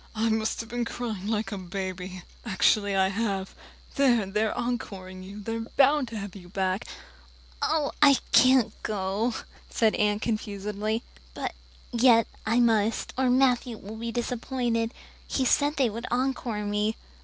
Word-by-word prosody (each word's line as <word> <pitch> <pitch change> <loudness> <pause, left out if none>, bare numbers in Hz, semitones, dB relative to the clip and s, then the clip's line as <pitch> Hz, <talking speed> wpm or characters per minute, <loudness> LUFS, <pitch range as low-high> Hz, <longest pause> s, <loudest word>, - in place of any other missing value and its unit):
"I've 220 +1 0
been 240 +1 -2
crying 225 -4 -4
like 215 -2 -1
a 200 - -4
baby, 185 0 -5 0.2
actually 200 -1 +2
I 190 0 +3
have. 195 -2 -2 0.4
There, 245 -6 +4
they're 210 +3 0
encoring 195 -6 -4
you 195 +3 -9
they're 225 +2 -3
bound 270 +4 +3
to 230 -1 -6
have 200 -2 -6
you 180 -3 -11
back!" 190 +1 -1 0.7
"Oh, 310 -2 +1
I 280 -2 +8
can't 255 -3 +5
go," 210 +3 -1 0.3
said 220 -2 +2
Anne 210 -1 +1
confusedly. 215 0 -2 0.3
"But - - -3 0.4
yet 235 -2 +5 0.2
I 230 +2 +3
must, 225 -2 +2
or 260 0 +2
Matthew 250 -2 +2
will 210 +2 -9
be 230 +1 -4
disappointed. 240 -1 -1 0.4
He 265 - 0
said 290 +4 +3
they 260 -6 +2
would 230 +3 -5
encore 245 -4 -1
me." 210 +2 0
220 Hz, 145 wpm, -27 LUFS, 200-245 Hz, 0.7 s, I